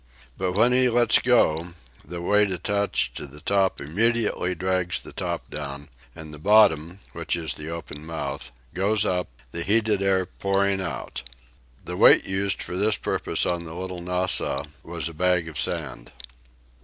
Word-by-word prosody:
But 95 -1 -1
when 115 +6 +4
he 125 0 +4
lets 120 -1 +4
go, 90 -9 +2 0.3
the 85 -1 -7
weight 105 +2 +3
attached 100 +3 0
to - - -5
the 70 +2 -12
top 95 +4 +1
immediately 105 +3 0
drags 90 0 0
the - - -10
top - - -3
down, 70 -1 -6 0.3
and 80 -1 -9
the 75 - -9
bottom, 95 -3 +4
which 85 0 -2
is 80 -4 -3
the 75 +3 -7
open 75 -3 -7
mouth, 80 -5 -4 0.2
goes 100 +4 +1
up, 90 -1 0 0.2
the 85 - -4
heated 105 +1 +2
air 95 -1 +2
pouring 100 +1 0
out. 90 -4 -4 0.6
The - - -4
weight - - +7
used 95 0 -1
for 90 - -6
this 105 +3 +2
purpose - - -1
on 85 -1 -1
the 80 0 -8
"Little 90 0 -5
Nassau" 90 +1 0 0.2
was 85 -1 -4
a 85 - -7
bag 90 0 +1
of 80 - -5
sand. - - -3
90 Hz, 165 wpm, -25 LUFS, 80-100 Hz, 0.6 s, weight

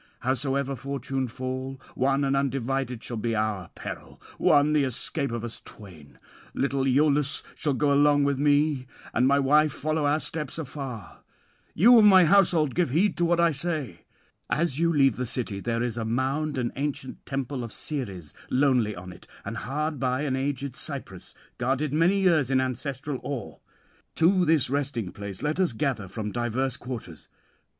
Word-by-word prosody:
Howsoever 135 +1 0
fortune 135 0 -3
fall, 130 +2 -5
one 135 +2 +1
and 135 0 +1
undivided 135 -2 -1
shall 120 - -5
be 115 +1 -1
our 105 -5 -1
peril, - - -8 0.2
one 145 +1 +4
the 150 -2 +3
escape 135 +2 -2
of 120 -1 -4
us 120 -1 -6
twain. 85 -9 -13 0.4
Little 135 -1 0
Iülus 140 +1 +2
shall 145 -4 -1
go 145 +1 +2
along 145 0 +4
with 140 -1 +1
me, 145 -2 +2 0.3
and 125 +3 +3
my 140 +1 +4
wife 150 +2 +4
follow 155 +2 -1
our 150 +2 +2
steps 150 -3 -4
afar. 135 -7 -7 0.6
You 235 +7 +7
of 215 - +6
my 190 -3 +8
household, 165 -6 +4
give 175 -5 +1
heed 175 +10 +2
to 175 - +2
what 170 0 +2
I 170 -1 +4
say. 145 - -3 0.4
As 155 -2 0
you 170 0 +3
leave 135 -6 +3
the 125 - -2
city 115 -5 -3
there 115 +3 -1
is 120 -1 -2
a - - -2
mound 135 +6 -1
and 120 -2 -1
ancient 140 -1 -4
temple 135 -1 -3
of 115 - -7
Ceres 100 - -5 0.2
lonely 125 -6 +2
on 90 +1 -9
it, - - -16 0.2
and - - -4
hard 150 +6 -3
by 130 +1 0
an 140 -3 -1
aged 135 -1 -3
cypress, 135 - -5 0.2
guarded 135 +4 0
many 175 +6 +3
years 160 -8 +3
in 135 -1 +3
ancestral 130 +2 -3
awe: 135 -7 -5 0.6
to 180 +2 +4
this 155 -4 +3
resting 130 -7 -2
place 100 -2 -7
let 150 +4 -1
us 180 -9 +2
gather 115 -5 -2
from 105 +2 -5
diverse 120 +2 -1
quarters. 115 - -8
135 Hz, 170 wpm, -26 LUFS, 120-150 Hz, 0.6 s, my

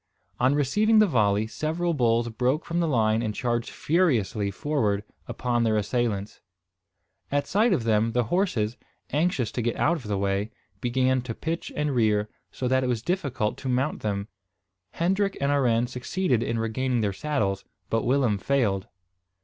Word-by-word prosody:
On 130 +3 +3
receiving 210 - +3
the 215 - +7
volley, 105 - +2
several 160 +8 -2
bulls 120 -4 +2
broke 125 +7 0
from 170 0 -1
the 170 - +1
line 110 -5 +2
and 110 -2 -2
charged 120 -1 -1
furiously 125 - +1
forward 105 -3 -1 0.2
upon 120 0 -1
their 110 -1 +2
assailants. 105 -2 -2 0.9
At 145 0 +1
sight 215 +4 +2
of 160 -11 +1
them, 110 0 +2
the 125 0 +2
horses, 120 - 0 0.3
anxious 145 - +1
to 120 - -2
get 120 0 -1
out 170 +3 +2
of 125 -8 -9
the 100 -1 -1
way, 100 +2 0 0.3
began 130 +2 +1
to 120 -2 -6
pitch 165 +1 -4
and 150 -1 0
rear, 105 -3 +2 0.2
so 130 - -3
that 130 +1 +2
it - - 0
was 120 -3 -1
difficult 140 - -1
to 130 - -4
mount 130 +4 0
them. 100 -1 -2 0.7
Hendrik 195 +4 0
and 140 +1 +1
Arend 120 -4 +2
succeeded 125 0 0
in 115 0 -1
regaining 120 +2 0
their 100 -2 0
saddles; 100 -7 -1 0.3
but 115 -1 +1
Willem 125 -5 +2
failed. 105 -7 0
125 Hz, 165 wpm, -26 LUFS, 110-145 Hz, 0.9 s, the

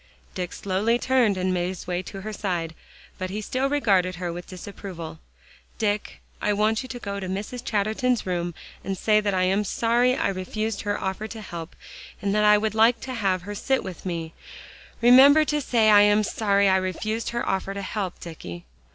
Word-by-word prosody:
Dick 180 -2 -4
slowly 200 +5 0
turned 245 -6 +2
and 185 0 0
made 175 -1 0
his 185 -1 -6
way 180 0 -2
to 195 +1 -8
her 215 +2 -6
side, 175 -5 -2 0.5
but 185 0 -3
he 205 +3 -4
still 255 +5 -1
regarded 195 -10 +2
her 175 -1 -4
with 175 +1 -8
disapproval. 180 -3 -8 0.6
"Dick, 210 -1 -2 0.2
I 210 - +1
want 215 +3 +1
you 255 - -9
to 250 - -5
go 200 -4 -5
to 190 -2 -5
Mrs. 210 +6 -4
Chatterton's 220 +3 0
room, 175 -2 -2 0.3
and 195 -1 -3
say 215 +3 +3
that 205 -2 0
I 185 - +2
am 195 +3 +2
sorry 235 +4 +2
I - - 0
refused 200 +3 -3
her 205 -1 -2
offer 190 +3 -3
to 220 0 -8
help, 170 -4 -8 0.4
and 200 -1 -1
that 210 0 +2
I 210 0 +7
would 215 +1 -1
like 225 +2 +4
to 260 -1 -5
have 195 -6 0
her 205 +2 -6
sit 265 +6 0
with 185 -3 -8
me. 165 -3 -4 0.7
Remember, 275 +5 +8
say 250 -8 +2
I 205 -1 +8
am 205 +1 +4
sorry 200 -1 +2
I 190 0 +4
refused 215 +5 -2
her 235 0 -3
offer 195 +1 -1
to 200 - -4
help, 190 -2 -4
Dicky." 90 - -8
200 Hz, 195 wpm, -25 LUFS, 185-220 Hz, 0.7 s, Remember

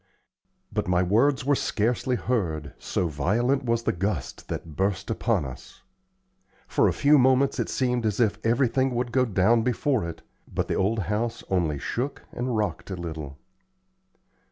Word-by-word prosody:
But - - -1
my 90 0 +3
words 130 +9 +2
were 145 - +3
scarcely 125 0 0
heard, 80 - -2
so 90 - -1
violent 115 - +1
was 115 -1 +1
the - - +2
gust 90 -5 -3
that 80 -3 -6
burst 95 +3 -1
upon - - 0
us. 65 -1 -10 0.8
For - - +3
a - - +3
few 145 0 +4
moments 130 +1 +3
it - - -1
seemed 125 -2 0
as 105 +1 -2
if 110 -2 +1
everything 125 +2 +2
would 120 0 -1
go 130 +2 +3
down 110 +2 +3
before 125 +1 +1
it, 85 - -9 0.3
but - - -1
the - - -1
old 105 +3 +1
house 115 +4 -2
only 85 -6 +1
shook 125 - -3
and 125 -2 -2
rocked 105 -1 -2
a 95 - -3
little. 80 -5 -6
115 Hz, 160 wpm, -26 LUFS, 90-125 Hz, 0.8 s, few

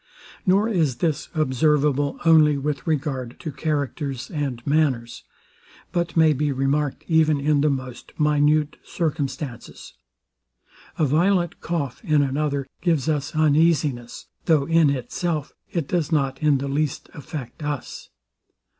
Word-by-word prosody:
Nor 195 +4 +4
is 165 - +1
this 155 +3 -1
observable 145 0 +1
only 155 -3 +6
with 140 +1 -3
regard 135 -6 -2
to 155 - -4
characters 140 -3 -3
and 135 -6 -3
manners, 140 -6 0 0.7
but 170 -1 -2
may 160 -1 +6
be 150 +1 0
remarked 135 +1 -1
even 155 -3 +3
in 145 0 +2
the 150 - +3
most 130 -3 -5
minute 150 0 +2
circumstances. 145 -6 -4 1.0
A 155 - +2
violent 175 +4 +1
cough 160 - -3
in 155 -6 +3
another 140 0 -1 0.2
gives 165 -6 +1
us 150 -1 -1
uneasiness; 150 -5 +1 0.2
though 155 -4 +3
in 165 -2 +4
itself 145 +4 -2 0.2
it 165 -5 -2
does 170 -2 -1
not 135 -4 0
in 150 -2 +4
the 140 +1 -4
least 145 +1 -2
affect 145 -2 -8
us. 145 -3 -5
150 Hz, 130 wpm, -23 LUFS, 140-160 Hz, 1.0 s, only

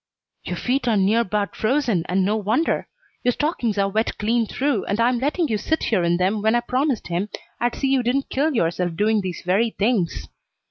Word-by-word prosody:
"Your - - -4
feet 255 +1 -1
are 225 -3 +3
near 210 +4 +3
'bout 205 -2 -2
frozen, 230 - 0
and 185 +1 +2
no 210 +2 +1
wonder. 220 +9 0 0.4
Your 245 - +3
stockings 245 - -1
are 200 0 +2
wet 215 +3 -1
clean 225 +1 +1
through, 280 +5 0
and 200 +3 -2
I'm 240 +1 +2
letting 300 +6 0
you 215 -5 -1
sit 320 +9 -1
here 210 -6 +1
in 170 0 +2
them 190 +4 +1
when 220 +2 +2
I 240 - +2
promised 255 -1 -1
him 180 +5 -1 0.3
I'd 240 0 0
see 270 - -1
you 270 -1 +3
didn't 255 +3 0
kill 290 +2 0
yourself 175 -3 0
doing 215 +3 +2
these 185 -3 -5
very 200 +6 +2
things. 210 -5 -1
220 Hz, 205 wpm, -22 LUFS, 195-255 Hz, 0.4 s, are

